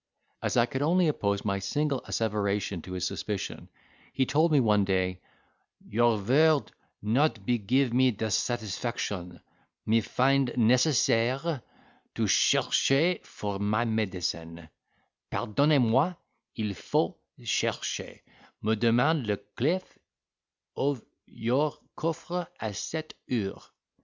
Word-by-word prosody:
As - - -1
I 120 - +5
could 130 +2 -4
only 170 +4 +3
oppose 100 -9 0
my 100 -1 0
single 140 +7 -1
asseveration 100 -4 -1
to 90 - -8
his 90 -2 -2
suspicion, - - -4 0.4
he 130 - +1
told 155 +5 +2
me 150 - +5
one 105 -4 +3
day, 95 -1 0 0.7
"Your 115 0 +3
vord 145 +8 +3 0.3
not 115 -1 +1
be 120 +1 +1
give 125 +4 +1
me 130 +1 +5
de 110 -1 -3
satisfaction—me 110 -2 -2
find 135 +3 +2
necessaire 125 +3 +2 0.5
to - - -3
chercher 160 +7 +3
for 100 -1 -5
my 105 +3 +1
medicine; 90 -7 -3 0.6
pardonnez 140 +7 +2
moi—il 125 - -1
faut - - -1 0.2
chercher—me 110 +1 -3
demand 120 +5 +3
le 105 -1 +1
clef 170 - -3 0.8
of 140 -4 -1 0.2
your 130 +6 0 0.2
coffre 170 +2 -3
a 110 -2 -4
cette 155 - -5 0.2
heure." 105 -6 -2
120 Hz, 110 wpm, -28 LUFS, 105-140 Hz, 0.8 s, I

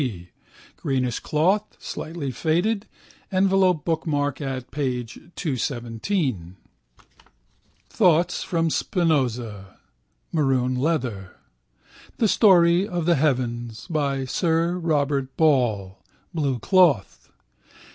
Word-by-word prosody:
P. 95 -10 -4 0.5
(green 130 -2 -1
cloth, 190 +8 0
slightly 155 -4 -5
faded, 175 - 0 0.4
envelope 190 -3 +2
bookmark 145 -4 -1
at 130 -3 -5
p. 130 -4 -1
217). 125 - -3 1.3
Thoughts 175 -4 +2
from 165 -2 0
Spinoza 125 - -1 0.5
(maroon 135 -5 +1
leather). 125 - -2 0.8
The 225 - +2
Story 180 -3 +5
of 175 -4 -3
the 175 - +4
Heavens 120 -6 -1
by 140 -4 0
Sir 170 +5 0
Robert 145 -5 -1
Ball 110 - +1 0.3
(blue 140 -6 0
cloth). 165 - +2
145 Hz, 85 wpm, -24 LUFS, 125-170 Hz, 1.3 s, Story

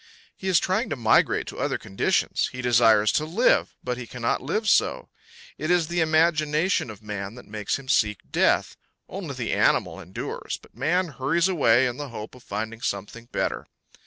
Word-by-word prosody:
He 190 - -7
is 185 -2 +4
trying 185 - 0
to 145 - -1
migrate 115 -4 +3
to - - -8
other - - 0
conditions; 95 - 0
he 125 0 -6
desires 115 -3 +5
to 155 - +1
live, 180 +11 +2
but 125 0 -3
he 120 - -7
cannot 120 -1 -2
live 210 - -2
so. - - +2 0.5
It 155 - -3
is 175 -2 +2
the 175 0 0
imagination 155 - +2
of 105 -1 -10
man 105 0 -5
that 125 - -12
makes 105 -1 -3
him 135 -1 -13
seek 105 -5 +2
death; - - +2 0.3
only - - -6
the - - -2
animal - - +2
endures, 90 - -5
but - - -21
man 170 +8 +1
hurries 150 +6 +1
away 130 -9 +4
in 125 -1 -2
the 145 -2 -6
hope 110 -2 -8
of 125 - -14
finding 110 +1 -5
something 105 +4 -4
better. - - -3
125 Hz, 185 wpm, -25 LUFS, 110-160 Hz, 0.5 s, desires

